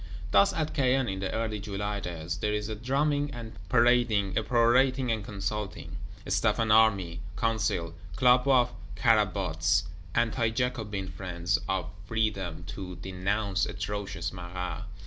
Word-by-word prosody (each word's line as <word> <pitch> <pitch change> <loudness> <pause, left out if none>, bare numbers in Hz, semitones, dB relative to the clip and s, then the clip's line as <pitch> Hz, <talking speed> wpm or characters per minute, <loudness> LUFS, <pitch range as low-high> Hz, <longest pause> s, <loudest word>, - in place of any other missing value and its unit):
Thus 100 0 +6
at 155 -1 -2
Caen, 130 -2 +2
in 95 -2 -3
the 95 -1 -2
early 110 -2 -2
July 105 0 -3
days, 85 -2 -4
there 105 +4 0
is 105 +1 -3
a 110 - -3
drumming 145 +5 0
and 115 -2 -7 0.2
parading, 120 -5 +3
a - - +3
perorating 125 +2 +3
and 110 -2 -1
consulting: 100 0 -4 0.3
Staff - - +2
and 110 -2 +1
Army; 100 -6 +4 0.2
Council; 105 -7 0 0.2
Club 125 +2 +4
of 125 -3 +4 0.2
Carabots, 95 -7 +2 0.3
Anti 115 0 +2
jacobin 110 -5 -2
friends 90 0 -1
of 95 -3 -1 0.2
Freedom, 100 -7 -1
to 95 -2 -6
denounce 95 +2 -1
atrocious 100 -4 -4
Marat. 90 +2 -5
105 Hz, 135 wpm, -29 LUFS, 95-115 Hz, 0.3 s, Thus